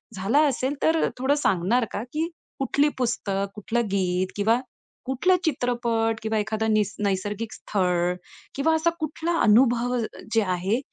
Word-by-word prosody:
झालं 235 +11 +3
असेल 260 +2 -1
तर 320 0 +3
थोडं 265 +3 +2
सांगणार 220 +1 +2
का? 205 - -3
की 305 +6 -2 0.3
कुठली 285 +2 +2
पुस्तक, 200 -5 -1
कुठलं 235 +3 -1
गीत 185 -1 +1
किंवा 220 +4 +2 0.5
कुठलं 265 +9 +2
चित्रपट 235 -5 0
किंवा 220 0 0
एखादं 220 +1 0
निस 210 -1 +1
नैसर्गिक 205 +3 -2
स्थळ 180 -3 0 0.4
किंवा 320 +4 +2
असा 320 +2 +2
कुठला 320 +2 -2
अनुभव 240 +2 +4 0.4
जे 225 - +4
आहे 185 +5 0
230 Hz, 135 wpm, -25 LUFS, 200-265 Hz, 0.5 s, अनुभव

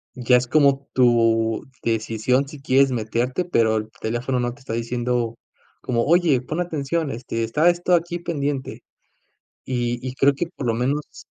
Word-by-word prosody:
ya 125 0 +4
es 125 - -1
como 140 0 +3
tu 115 -3 +3 0.2
decisión 115 +4 0
si 145 0 -11
quieres 135 0 +3
meterte, 120 +7 -1
pero 110 -9 +2
el 110 0 -4
teléfono 120 +3 -1
no 120 0 -1
te 145 - -18
está 120 -3 -6
diciendo 120 0 -1 0.5
como: 115 -2 0
"Oye, 165 -5 +4
pon 155 +6 -4
atención, 160 -2 -2
este, 115 -2 -4
está 150 +10 +3
esto 175 +1 +1
aquí 170 +1 -2
pendiente". 145 -5 -3 0.8
Y 120 -1 -1
y 130 - -5
creo 140 +1 +4
que 160 +5 -3
por 130 - -5
lo 115 - +2
menos 135 +6 -3
125 Hz, 165 wpm, -22 LUFS, 115-145 Hz, 0.8 s, ya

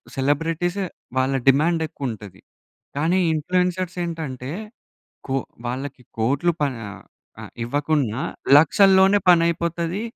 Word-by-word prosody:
Celebrities 165 +7 0 0.4
వాళ్ళ 130 +1 +1
demand 160 +5 +4
ఎక్కువుంటది. 105 -10 -7 0.6
కానీ 165 +6 +2
ఇన్‌ఫ్లుయెన్సర్‌లు 180 +2 -1
ఏంటంటే 140 -6 -5 0.8
కొ 135 - -1 0.3
వాళ్ళకి 130 +1 -5 0.2
కోట్లు 140 +9 +1
ప - - +1 0.3
ఆహ్, 100 - -11 0.4
ఆహ్, - - -11
ఇవ్వకున్నా 140 -2 -1 0.4
లక్షల్లోనే 195 +4 +5
పనైపోతది. 170 +2 +1
155 Hz, 95 wpm, -22 LUFS, 135-175 Hz, 0.8 s, లక్షల్లోనే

